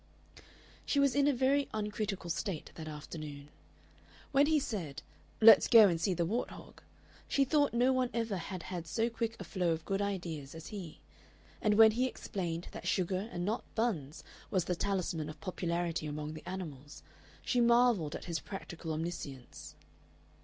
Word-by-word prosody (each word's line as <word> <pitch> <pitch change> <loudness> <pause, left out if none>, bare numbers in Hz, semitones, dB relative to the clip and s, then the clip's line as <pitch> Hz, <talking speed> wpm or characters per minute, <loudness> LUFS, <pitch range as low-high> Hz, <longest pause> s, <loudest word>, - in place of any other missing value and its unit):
She 285 - +1
was 280 -2 +4
in 285 0 +3
a - - +5
very 270 +2 +2
uncritical 210 -4 -3
state 185 -3 -3
that 160 -1 -8
afternoon. 150 -1 -8 0.8
When 280 +1 +5
he 315 0 +4
said, 160 - -4 0.4
"Let's 220 -3 +9
go 225 -3 +9
and 170 -3 0
see 185 +1 +1
the 170 0 +1
wart 225 +8 -1
hog," - - -12 0.5
she 275 - +2
thought 290 +1 +3
no 245 +3 +3
one 255 -1 +1
ever 230 -4 -1
had 180 0 -6
had 175 -3 -5
so 230 +7 0
quick 230 -1 -2
a - - -5
flow 180 -4 0
of 160 0 -6
good 195 0 -1
ideas 170 -8 -4
as 160 - -8
he; 185 -7 -8 0.6
and 210 -1 +3
when 220 0 +8
he 250 +4 +1
explained 175 -8 -4
that - - -7
sugar 185 +3 0
and 175 0 -3
not 220 +4 -1
buns 170 - -1 0.3
was 185 -3 +1
the 180 - 0
talisman 175 -4 -1
of 155 - -9
popularity 170 -3 -2
among 150 +1 -4
the 155 - -9
animals, 150 -7 -7 0.4
she 245 - +2
marvelled 235 -9 +4
at - - -7
his 170 -2 -2
practical 170 -4 -6
omniscience. 140 - -6
185 Hz, 170 wpm, -33 LUFS, 160-230 Hz, 0.8 s, Let's